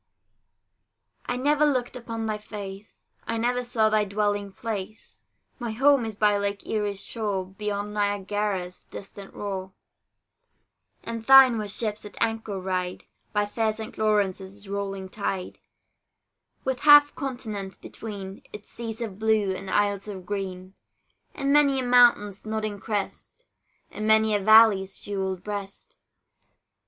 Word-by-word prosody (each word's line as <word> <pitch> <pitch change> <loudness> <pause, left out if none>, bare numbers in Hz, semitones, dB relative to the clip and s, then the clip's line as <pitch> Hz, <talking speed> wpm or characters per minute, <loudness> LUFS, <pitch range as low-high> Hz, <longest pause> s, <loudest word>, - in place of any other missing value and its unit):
I 245 - -1
never 295 +3 +2
looked 255 -5 +1
upon 230 -2 -5
thy 215 -1 -2
face; 200 -1 -9 0.2
I 230 - -1
never 245 +2 0
saw 235 -3 +2
thy 215 0 +3
dwelling 205 0 -1
place; 215 0 -6 0.4
My 235 -3 -3
home 270 +1 +4
is 220 -2 -5
by 205 -1 +3
Lake 200 0 -3
Erie's 205 -2 -2
shore, 205 -5 -2
Beyond 205 +2 -4
Niagara's 205 -2 -1
distant 195 0 -10
roar; 190 -2 -5 1.3
And 230 -1 -5
thine 265 -3 +8
where 210 - -3
ships 210 +1 -2
at 210 - -11
anchor 225 -3 -1
ride, 185 -1 -3 0.3
By 205 -1 +1
fair 220 +1 0
St. 220 0 -7
Lawrence's 200 -2 0
rolling 195 -1 -4
tide, 190 -2 -4 1.0
With 265 -1 -1
half 290 0 +8
a - - -36
continent 215 -8 -5
between 200 -3 -8
Its 210 0 -11
seas 225 0 -6
of 210 -4 -5
blue, 220 -3 +2
and 190 0 -7
isles 205 0 +1
of 190 -3 -7
green, 185 -1 -5 0.6
And 275 -1 0
many 285 -2 +5
a 260 - 0
mountain's 240 -5 +4
nodding 215 -1 -3
crest, 210 - -5 0.5
And 215 - -4
many 220 0 +4
a 205 - +3
valley's 205 -2 +6
jewelled 190 -2 -3
breast. 200 -1 -7
210 Hz, 135 wpm, -26 LUFS, 195-225 Hz, 1.3 s, thine